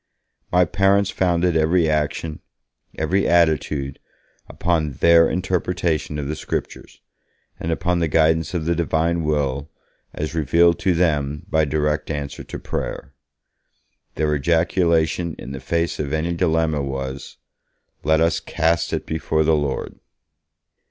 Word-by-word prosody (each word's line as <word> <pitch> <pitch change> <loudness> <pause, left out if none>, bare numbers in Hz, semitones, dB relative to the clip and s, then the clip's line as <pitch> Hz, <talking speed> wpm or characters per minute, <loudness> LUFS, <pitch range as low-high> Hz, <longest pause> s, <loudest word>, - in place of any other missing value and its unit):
My 90 0 +4
parents 100 +2 +2
founded 90 -1 +1
every 80 +2 +3
action, 75 +1 -1 0.6
every 90 +5 +1
attitude, 75 -5 +1 0.5
upon 80 -4 -1
their 85 +5 +5
interpretation 90 -4 -1
of 70 -2 -3
the 75 - -3
Scriptures, - - -6 0.6
and 85 - -3
upon 90 +2 0
the 85 - +1
guidance 80 +3 +2
of 80 -3 -2
the 85 - +2
Divine 85 0 0
Will 75 -1 -1 0.5
as 75 +1 -4
revealed 85 +2 +3
to 95 -3 +1
them 75 -4 0
by 80 -1 +3
direct 75 +1 -1
answer 75 -2 -4
to - - -7
prayer. 70 - -5 1.0
Their 75 0 0
ejaculation 85 +1 +1
in 65 - -8
the 70 - -6
face 85 +5 -1
of 75 -1 -3
any 80 +2 0
dilemma 80 -3 +1
was, 65 0 -5 0.7
'Let 80 +1 +3
us 80 0 +2
cast 85 0 0
it - - -2
before 80 0 0
the 80 +1 +3
Lord!' 75 -3 -3
80 Hz, 130 wpm, -21 LUFS, 75-85 Hz, 1.0 s, their